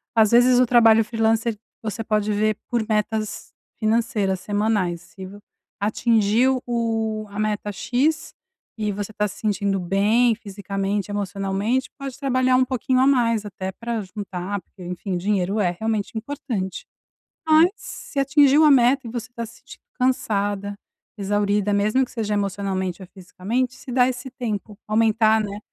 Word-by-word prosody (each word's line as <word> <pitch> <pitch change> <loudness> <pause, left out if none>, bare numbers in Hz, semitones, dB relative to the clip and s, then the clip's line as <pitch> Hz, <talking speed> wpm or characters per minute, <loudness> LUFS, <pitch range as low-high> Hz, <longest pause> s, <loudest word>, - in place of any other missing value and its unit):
às 220 -2 +5
vezes 245 +1 +6
o 255 - +5
trabalho 225 -2 +5
freelancer, 225 0 0 0.2
você 225 0 -4
pode 215 -1 0
ver 215 +1 +1
por 235 -3 0
metas 215 0 -2 0.3
financeiras 215 -4 +1
semanais, 205 -4 0
se 190 +2 -11 0.5
atingiu 230 +4 +2
o 225 -2 -1
a 200 - -9
meta 210 -1 -1
X 290 +9 -1 0.4
e 210 -1 -1
você 205 +1 -5
tá 210 0 -1
se 200 - -10
sentindo 200 -2 0
bem 210 +7 +3
fisicamente, 200 -1 -3
emocionalmente, 205 +5 -1
pode 275 -2 -6
trabalhar 255 -2 +2
um 255 - +5
pouquinho 255 0 0
a - - +5
mais 230 -5 +2
até 190 -1 -5
pra 230 +1 -4
juntar, 195 -1 -5
porque 190 - -19
enfim, 180 +1 -4
dinheiro 195 +2 0
é 180 -3 +1
realmente 220 0 -2
importante. 230 -6 -4 0.6
Mas 315 +2 +6
se 280 - -7
atingir 280 +1 +5
uma 310 -1 +7
meta 260 0 +4
e - - -7
você 240 +1 -5
está 235 -1 -5
se 230 +1 -14
sentindo - - -14 0.2
cansada, 205 -5 0 0.4
exaurida, 205 0 0
mesmo 215 +6 +2
que - - -18
seja 215 -3 -2
emocionalmente 195 -2 -2
ou 185 - -9
fisicamente, 210 +7 -3
se 260 - -10
dá 250 0 +4
esse 255 +1 -4
tempo, 215 -5 -5
aumentar, 220 0 +3
né, 205 0 -5
215 Hz, 150 wpm, -23 LUFS, 200-245 Hz, 0.6 s, uma